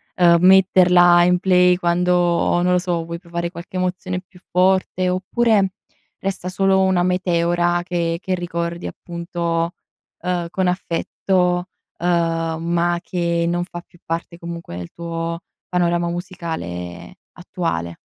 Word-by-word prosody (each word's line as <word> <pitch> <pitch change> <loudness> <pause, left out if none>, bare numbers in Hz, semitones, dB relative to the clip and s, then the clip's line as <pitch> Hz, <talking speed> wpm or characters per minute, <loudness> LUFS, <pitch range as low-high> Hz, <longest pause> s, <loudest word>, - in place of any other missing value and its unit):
ehm, 170 -2 +5
metterla 180 -2 +6
in 180 0 +3
play 180 -1 +4
quando, 175 0 +2
non 180 0 +2
lo - - +4
so, 175 -2 -2
vuoi 170 0 -6
provare 170 -1 -4
qualche 175 +1 -8
emozione 185 0 -2
più 180 0 -19
forte 185 0 +2
oppure, 195 +2 +2 0.5
resta 190 -2 -3
solo 190 0 +2
una 190 -2 +2
meteora 175 -1 +1
che 170 -2 -1
che 185 -1 -1
ricordi 170 -1 -4
appunto, 170 -1 -3 0.4
ehm, 180 -2 -2
con 185 +1 0
affetto, 180 0 0 0.3
uhm, 165 -2 0
ma 170 +1 +1
che 170 -2 -1
non 175 +1 0
fa 175 -1 -8
più 175 0 -19
parte 170 +1 -4
comunque 170 - -7
del 90 -1 -7
tuo 165 0 -4 0.3
panorama 175 -1 +1
musicale 125 - -6 0.2
attuale? 165 - -4
175 Hz, 130 wpm, -20 LUFS, 170-180 Hz, 0.5 s, metterla